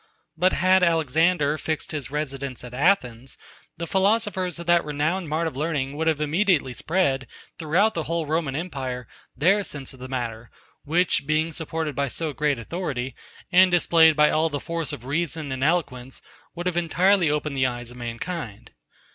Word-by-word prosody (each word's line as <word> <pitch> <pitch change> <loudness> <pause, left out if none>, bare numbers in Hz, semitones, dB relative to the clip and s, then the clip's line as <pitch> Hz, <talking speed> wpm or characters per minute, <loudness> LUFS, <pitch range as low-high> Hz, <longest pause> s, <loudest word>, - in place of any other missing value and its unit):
But 180 +3 +2
had 185 +1 +4
Alexander 160 -1 +2
fixed 155 -1 -3
his 150 -4 -4
residence 140 -4 -4
at 125 -1 -9
Athens, 130 -5 0 0.4
the 170 - -3
philosophers 190 -1 +1
of 170 - -7
that 175 0 +4
renowned 150 +4 -1
mart 160 +2 0
of 160 - -3
learning 145 -2 -2
had 160 -1 +1
immediately 155 -3 +1
spread, 140 -5 0 0.3
throughout 175 +8 +2
the 165 -5 -3
whole 165 0 -1
Roman 155 -2 -1
empire, 130 -7 -4 0.3
their 190 +9 +3
sense 140 -7 -5
of 130 - -15
the 130 - -7
matter; 120 -3 -4 0.3
which, 165 -2 +1
being 155 +1 +1
supported 160 -2 -4
by 140 0 0
so 155 +3 -4
great 145 -1 0
authority, 130 -1 -4 0.4
and 185 +1 +7
displayed 165 -2 +5
by 150 0 +5
all 160 +1 +2
the 145 -2 -3
force 165 -3 -3
of 120 - -7
reason 155 0 -2
and 130 0 -3
eloquence, 140 -6 -1 0.3
had 175 0 -2
entirely 175 +1 +3
opened 150 -1 -1
the 130 -1 +2
eyes 120 -1 -6
of 125 - -12
mankind. 120 - -6
155 Hz, 165 wpm, -24 LUFS, 135-170 Hz, 0.4 s, and